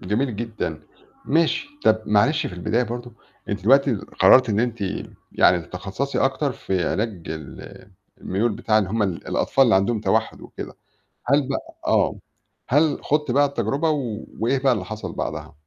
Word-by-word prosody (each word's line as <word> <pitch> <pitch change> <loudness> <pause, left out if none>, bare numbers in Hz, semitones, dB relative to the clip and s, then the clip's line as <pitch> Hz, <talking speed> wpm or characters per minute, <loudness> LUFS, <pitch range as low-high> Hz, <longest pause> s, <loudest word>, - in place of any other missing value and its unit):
جميل 110 +5 -1
جدًا، 110 -9 -4 0.4
ماشي. 165 - +1 0.2
طَب 110 0 +4
معلش 130 +10 +3
في - - -6
البداية 110 +7 0
برضه 120 0 -5 0.4
إن - - -3
أنتِ 100 -2 -4
دلوقتي 135 +4 +4
قرّرتِ 115 +5 +4
إن 105 0 +1
أنتِ 120 -2 -2 0.5
يعني 90 -1 +4
تتخصَّصي 95 +11 -4
أكتر 135 +1 +1
في 95 -6 -2
علاج 105 -5 -2
ال 80 +5 -9 0.3
الميول 105 +5 0
بتاع 110 0 +1
اللي 95 -3 -1
هُم 110 +1 0
ال 95 -4 -3
الأطفال 135 - +2
اللي 115 - +4
عندهم 100 +4 +2
توحُّد 110 +1 0
وكده. - - -9 0.5
هل 140 +1 +2
بقى 135 - -5
آه. - - +2 0.5
هل 145 +3 +3
خُضتِ 150 -2 0
بقى 140 +4 +4
التجربة 140 +4 -1 0.5
وإيه 125 +5 +1
بقى 135 0 +3
اللي 105 -6 -2
حصل 110 +3 -6
بعدها؟ - - -5
115 Hz, 160 wpm, -23 LUFS, 100-135 Hz, 0.5 s, طَب